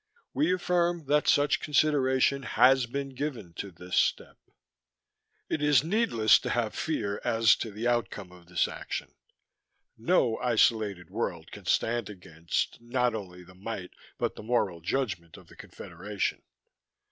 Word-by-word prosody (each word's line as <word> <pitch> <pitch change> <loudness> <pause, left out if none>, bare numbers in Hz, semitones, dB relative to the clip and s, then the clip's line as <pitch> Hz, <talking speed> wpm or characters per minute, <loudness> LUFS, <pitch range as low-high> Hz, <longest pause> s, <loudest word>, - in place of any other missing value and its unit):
We 295 - +2
affirm 175 -2 0
that 150 +2 +2
such 145 +1 +3
consideration 140 -2 +2
has 130 +1 +4
been 140 +3 -4
given 130 - -5
to 100 - -5
this 90 0 -7
step. - - +1 1.1
It 155 - -2
is 145 -3 +4
needless 165 - +3
to - - -4
have 115 -3 0
fear 105 -11 -2
as 115 -1 +4
to 115 - -4
the 110 +3 -3
outcome 105 -5 -1
of 90 -1 -17
this 90 0 +1
action. - - -6 0.9
No 120 -3 +2
isolated 110 -7 +1
world - - -4
can - - -11
stand 115 -2 +1
against, 85 -1 -4
not 125 0 0
only 90 -4 -7
the 95 +1 -16
might, 95 -1 -6 0.3
but - - -1
the - - -9
moral 105 -7 0
judgment 90 -4 -3
of - - -17
the - - -15
Confederation. 95 +4 -5
115 Hz, 145 wpm, -28 LUFS, 95-135 Hz, 1.1 s, has